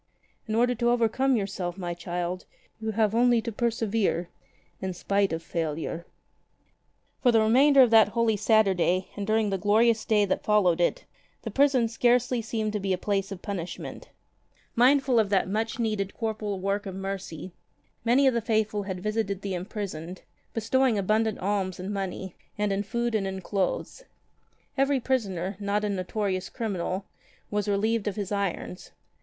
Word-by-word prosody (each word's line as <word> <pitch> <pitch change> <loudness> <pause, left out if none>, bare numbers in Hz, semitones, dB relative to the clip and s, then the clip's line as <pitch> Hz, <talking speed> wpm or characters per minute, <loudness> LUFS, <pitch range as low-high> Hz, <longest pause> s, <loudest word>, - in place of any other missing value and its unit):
In 215 - -1
order 245 +2 +3
to 240 0 +1
overcome 245 +3 +2
yourself, 195 -4 -3
my 175 -2 -3
child, 175 +1 -4 0.3
you 220 0 -3
have 215 -1 +2
only 240 0 +4
to 230 - -3
persevere 220 -6 0 0.3
— - - -37
in 190 -1 -3
spite 200 +2 +1
of 165 0 -3
failure'' 165 +1 -3 1.1
For 245 - +5
the 225 - +4
remainder 265 +5 +6
of 240 - +2
that 220 -2 +7
Holy 225 0 +1
Saturday 195 -4 +2
and 205 -1 -4
during 215 -1 +2
the 195 - -1
glorious 220 +3 +3
Day 210 -2 +3
that 190 - -1
followed 185 -5 +3
it, 175 - 0 0.5
prison 270 -4 +4
scarcely 245 +1 +2
seemed 220 -1 -2
to 210 - -1
be 195 -1 0
a - - 0
place 195 +1 -1
of 190 -2 -7
punishment. 185 -5 -6 0.7
Mindful 260 0 +4
of 210 -3 +2
that 195 -3 +2
much 220 +3 -2
needed 215 -4 -1
corporal 215 -3 -3
work 200 +2 -1
of 190 - -6
mercy 190 -3 -5 0.5
many 245 +4 +4
of 265 - +5
the 235 - 0
faithful 215 -2 0
had 190 -2 -5
visited 215 -2 -2
the 195 -1 -3
imprisoned, 180 -2 -5 0.3
bestowing 235 +1 +2
abundant 215 +2 +1
alms 190 -1 -1
in 190 +3 -4
money, 190 -2 -4 0.2
in 200 -1 0
food 235 +3 -2
and 205 -3 0
in 190 0 -4
clothes. 195 - -2 0.7
Every 275 0 +3
prisoner, 195 -8 -1
not 205 +1 -1
a 210 - 0
notorious 190 0 -2
criminal, 195 -3 -3 0.5
was 210 0 -1
relieved 215 +2 +1
of 205 - -1
his 205 -2 -4
irons. 195 -2 -3
205 Hz, 160 wpm, -27 LUFS, 190-225 Hz, 1.1 s, that